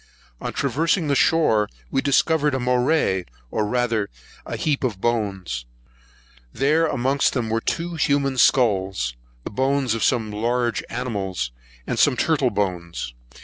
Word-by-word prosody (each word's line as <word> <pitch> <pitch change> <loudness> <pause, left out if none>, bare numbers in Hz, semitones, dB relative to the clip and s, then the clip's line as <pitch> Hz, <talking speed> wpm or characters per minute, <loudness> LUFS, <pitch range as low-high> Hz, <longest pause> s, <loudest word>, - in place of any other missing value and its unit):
On - - -3
traversing 165 +1 0
the 140 - +3
shore, 120 -10 +3 0.2
we 135 - +1
discovered 145 +1 +2
a - - -1
morai, 125 - +2 0.3
or 105 -1 0
rather 115 -3 0 0.4
a - - -3
heap 145 -3 0
of 110 -7 -1
bones. 95 - -2 0.8
There 150 - +2
were 165 - +3
amongst 135 0 +1
them 115 -4 -1 0.2
two 170 +1 -1
human 140 -3 +1
skulls, 95 - +2 0.3
the - - -6
bones 135 +1 +1
of 115 - -2
some 115 -4 +1
large 120 +2 0
animals, 100 - -3 0.3
and - - -2
some - - +4
turtle - - +2
bones. 85 -9 -3
120 Hz, 140 wpm, -23 LUFS, 100-140 Hz, 0.8 s, some